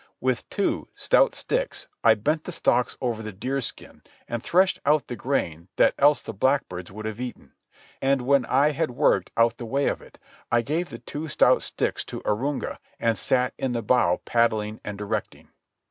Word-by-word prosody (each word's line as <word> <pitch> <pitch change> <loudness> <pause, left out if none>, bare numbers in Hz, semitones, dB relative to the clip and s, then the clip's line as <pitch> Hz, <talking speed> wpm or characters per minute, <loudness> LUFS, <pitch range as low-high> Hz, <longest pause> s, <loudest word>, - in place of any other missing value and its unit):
With - - -1
two - - -1
stout - - +3
sticks - - -2 0.2
I - - +7
bent 155 +9 -1
the - - -5
stalks 125 -6 +1
over 120 -4 -1
the 110 -1 -6
deerskin 130 +7 -4 0.3
and 120 -1 -3
threshed 185 +7 +3
out 150 +1 +3
the 120 - -5
grain 85 - -2
that - - +4
else 145 +1 +5
the 110 - -6
blackbirds 95 -7 0
would 110 +2 -8
have 110 +2 -4
eaten. 125 -1 -7 0.5
And 135 -1 +2
when 140 +1 +4
I 140 +3 +4
had 155 +2 -1
worked 120 - +2
out 115 0 +3
the 120 - -6
way 140 +4 0
of - - -1
it, - - -16 0.3
I 120 0 +3
gave 165 +7 -1
the - - -7
two 155 +2 -6
stout 150 - +4
sticks - - -2
to - - -7
Arunga, 135 +7 -1 0.2
and 115 -1 +2
sat 125 +5 +1
in 130 -2 -1
the 115 -1 -2
bow 105 -6 +3
paddling 110 -2 +1
and 105 -1 -5
directing. 105 0 -4
125 Hz, 185 wpm, -25 LUFS, 110-140 Hz, 0.5 s, I